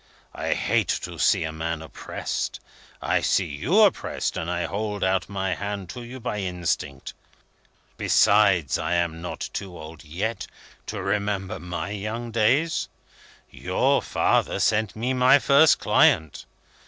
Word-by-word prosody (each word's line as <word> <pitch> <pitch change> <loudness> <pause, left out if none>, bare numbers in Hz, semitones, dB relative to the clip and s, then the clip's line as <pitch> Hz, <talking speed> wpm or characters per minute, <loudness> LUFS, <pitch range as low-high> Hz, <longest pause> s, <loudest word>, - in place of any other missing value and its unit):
"I - - -1
hate - - +1 0.2
to - - -7
see - - +3
a 80 - -3
man 80 0 -4
oppressed. 80 - -5 0.4
I - - +1
see - - +2
you 125 - +1
oppressed, 205 -4 +1
and 80 - -3
I 90 -1 -1
hold 105 +1 -3
out 95 0 +1
my 95 -2 -2
hand 100 -2 -5
to 125 - -8
you 120 +2 -9
by 110 -3 -3
instinct. 90 -3 -3 0.8
Besides, 100 -8 +3
I 85 +2 -1
am 85 -1 -1
not 90 - -5
too 95 -3 -6
old 80 0 -10
yet, 95 +9 -4 0.4
to - - -4
remember 100 -1 -2
my 85 +1 -5
young 110 +4 -4
days. 130 +9 +1 0.6
Your - - +1
father - - +1
sent 110 -1 +1
me 120 +4 -1
my 125 +2 +6
first 140 +2 +5
client. 80 -2 +2
100 Hz, 140 wpm, -24 LUFS, 85-110 Hz, 0.8 s, my